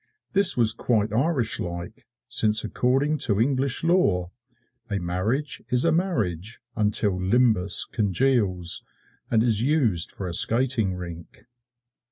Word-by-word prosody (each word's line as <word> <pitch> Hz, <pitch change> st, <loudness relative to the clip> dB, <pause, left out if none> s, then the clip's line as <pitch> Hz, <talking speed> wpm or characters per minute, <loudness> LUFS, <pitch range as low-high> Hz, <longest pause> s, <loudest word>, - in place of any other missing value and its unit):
This 200 Hz, -6 st, +4 dB
was 115 Hz, -2 st, +3 dB
quite 110 Hz, -3 st, 0 dB
Irish 125 Hz, -2 st, 0 dB
like, 85 Hz, 0 st, -7 dB, 0.2 s
since 110 Hz, 0 st, +1 dB
according 135 Hz, +5 st, 0 dB
to 105 Hz, -5 st, 0 dB
English 135 Hz, +3 st, 0 dB
Law 100 Hz, -, +1 dB, 0.6 s
a 100 Hz, -, -1 dB
marriage 100 Hz, +11 st, -2 dB
is 125 Hz, +3 st, +1 dB
a 165 Hz, -, +3 dB
marriage 115 Hz, -, -2 dB, 0.2 s
until 105 Hz, -3 st, 0 dB
Limbus 105 Hz, -1 st, +2 dB
congeals 100 Hz, -5 st, 0 dB, 0.5 s
and 110 Hz, -1 st, +2 dB
is 115 Hz, -3 st, +2 dB
used 120 Hz, -, +1 dB
for 95 Hz, -, -6 dB
a 85 Hz, -, -5 dB
skating 115 Hz, -2 st, +1 dB
rink. 85 Hz, -2 st, -10 dB
110 Hz, 125 wpm, -24 LUFS, 95-130 Hz, 0.6 s, This